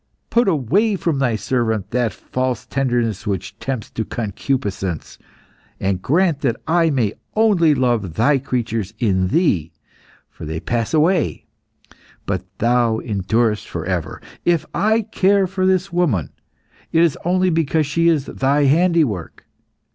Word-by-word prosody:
Put 235 -1 +3
away 190 - +2
from 165 -6 -1
Thy 125 -4 +1
servant 110 -3 -1
that 120 -2 +1
false 125 +3 -3
tenderness 120 -6 -1
which 100 +2 -4
tempts 130 -5 -4
to 110 - -3
concupiscence, 100 - -3 0.6
and 95 -1 -1
grant 165 - +2
that 120 -5 +1
I 165 0 +3
may 120 -8 0 0.2
only 195 -9 +4
love 120 - 0
Thy 135 +7 +3
creatures 115 -6 -3
in 95 -6 +1
Thee, 95 - +1 0.6
for - - -13
they 80 +1 -4
pass 115 - -1
away, 165 +2 +1 0.8
but 95 -2 -2
Thou 120 -1 +2
endurest 110 +1 0
for 85 -1 -5
ever. 90 -3 -3 0.2
If 170 -3 +2
I 220 +2 +2
care 195 0 +2
for 185 0 -1
this 190 0 +1
woman, 145 - +1 0.6
it 165 - +4
is 165 -5 +2
only 185 +1 +2
because 160 -1 +1
she 165 +4 +1
is 155 -5 +2
Thy 140 +2 +1
handiwork. 150 - +1
130 Hz, 140 wpm, -20 LUFS, 110-170 Hz, 0.8 s, only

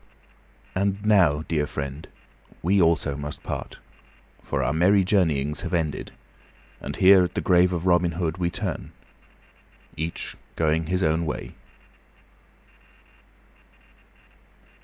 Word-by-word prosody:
And 100 +2 -1
now, 85 -8 +4
dear 75 -3 0
friend, 70 0 -6 0.6
we 95 +3 +3
also 80 -4 +2
must 75 +1 -6
part, - - -5 0.6
for - - -2
our - - 0
merry 95 +5 +4
journeyings 75 -7 +1
have 90 -1 -2
ended, 80 -4 -2 0.7
and - - -6
here, 95 0 +6
at 90 - -3
the - - 0
grave 90 0 +4
of 85 -1 -3
Robin 85 -2 +3
Hood, 85 +1 -2
we 85 -1 +1
turn, - - -4 1.0
each 80 +2 -4 0.2
going 80 0 +1
his 90 +2 0
own 80 +1 +1
way. - - -5
85 Hz, 115 wpm, -24 LUFS, 75-90 Hz, 1.0 s, here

